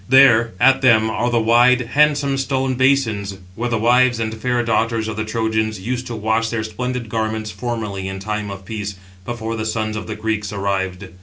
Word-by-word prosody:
There, 120 -4 +6
at 135 +1 +5
them, 110 -4 +4
are 120 +2 0
the 120 -1 +2
wide, 120 +3 +4
handsome 145 -1 +3
stone 135 -1 0
basins, 120 -7 +1 0.2
where 120 +5 -3
the 115 - 0
wives 120 +2 +3
and 110 -1 -2
fair 120 +2 -1
daughters 115 0 0
of 110 - -4
the 110 - -2
Trojans 110 -1 -1
used 125 +5 -3
to 120 - -5
wash 110 +1 0
their 110 -1 -2
splendid 125 +2 -4
garments 110 -1 -2
formerly 105 -3 -4
in 95 0 -5
time 105 +1 -4
of 95 -1 -8
peace, 105 -1 -5 0.3
before 115 -1 -4
the 110 - -3
sons 110 0 -2
of 105 - -5
the 110 - -4
Greeks 105 -2 -2
arrived. 95 -1 -2
110 Hz, 190 wpm, -20 LUFS, 105-120 Hz, 0.3 s, There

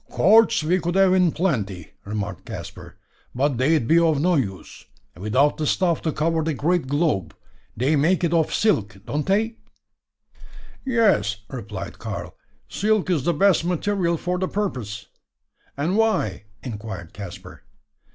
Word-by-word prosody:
"Cords 220 0 +4
we 175 +4 +2
could 175 0 -2
have 190 -1 +5
in 180 -3 +4
plenty," 105 - -2
remarked 100 -3 -5
Caspar, - - -9 0.4
"but 135 -1 0
they'd 140 -2 +2
be 165 +5 +5
of 160 -4 +2
no 180 +4 +2
use, 100 - -3 0.3
without 120 +10 +1
the 155 - -1
stuff 175 -1 +1
to 160 - -1
cover 160 +2 0
the 160 -1 -1
great 165 +2 0
globe. 145 - 0 0.4
They 135 +7 +2
make 165 +6 +2
it 170 -1 +1
of 160 -2 +2
silk, 115 - +1
don't 150 +1 -3
they?" 220 +4 +1 1.3
"Yes," 200 - +2
replied 100 -7 -7
Karl, - - -6 0.3
"silk 210 -2 0
is 155 -7 0
the 175 - +2
best 195 0 +3
material 180 0 0
for 180 +2 -2
the 185 - 0
purpose." 120 - -4 0.7
"And 160 +7 0
why?" 215 - +1 0.2
inquired 105 -8 -7
Caspar. 95 -2 -9
155 Hz, 145 wpm, -23 LUFS, -, 1.3 s, have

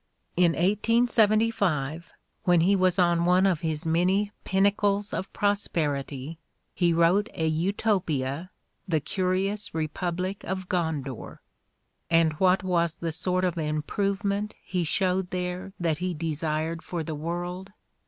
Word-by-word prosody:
In 175 -1 +4
1875, 210 - +2 0.4
when 175 -2 +5
he 195 +4 +4
was 185 -1 +2
on 175 -2 +3
one 180 +2 +4
of 185 -5 +2
his 160 0 -2
many 185 +5 +2
pinnacles 200 +1 +1
of 190 - -3
pros 205 0 0
perity, 145 -1 -3 0.3
he 175 -2 +2
vtTote 170 +5 +3
a 160 - -1
Utopia, 165 -3 0 0.4
"The 160 -4 +2
Curious 190 +5 -1
Repmblic 175 +4 -2
of 190 0 -4
Gondour." 160 - -3 0.7
And 165 -1 +4
what 185 0 +4
was 170 -3 +1
the 165 -1 -3
sort 185 +3 0
gf 175 -2 -1
improvement 200 +7 -1
he 180 -2 -1
showed 185 +2 0
there 180 +1 -4
that 165 -3 0
he 180 -1 -2
desired 160 +1 -2
for 170 -2 -4
the 155 - -4
world? 175 +5 -4
180 Hz, 130 wpm, -27 LUFS, 160-195 Hz, 0.7 s, when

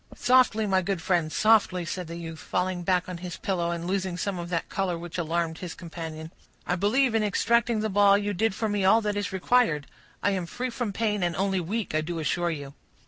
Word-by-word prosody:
"Softly, 245 -4 +4
my 190 -2 +2
good 190 0 -2
friend, 165 -2 0
softly," 205 -5 +3
said 180 0 -4
the 165 - -6
youth, 165 -1 -7
falling 180 0 -2
back 180 0 +1
on 180 -2 -6
his 180 0 -6
pillow, 175 -3 -1
and 170 0 -3
losing 185 -1 -1
some 185 +1 -2
of 170 0 -5
that 170 -2 -2
color 185 -3 -1
which 175 +1 -6
alarmed 165 0 -1
his 180 -2 -6
companion. 160 -2 -7 0.3
"I 180 - 0
believe, 225 +7 +2
in 225 - +2
extracting 230 +2 +2
the 220 - 0
ball, 200 0 +5
you 205 0 -2
did 210 +2 0
for 220 - -1
me 205 -2 0
all 205 +4 +5
that 210 -1 -1
is 205 -1 -2
required. 190 -6 +2 0.4
I 205 - +3
am 185 -3 -2
free 250 +6 -4
from 235 -3 -3
pain 210 -1 -1
and 175 -1 0
only 195 +1 0
weak, 205 +4 -3
I 155 - +2
do 170 +2 -4
assure 170 +2 0
you." 145 -4 -5
185 Hz, 225 wpm, -27 LUFS, 170-210 Hz, 0.4 s, ball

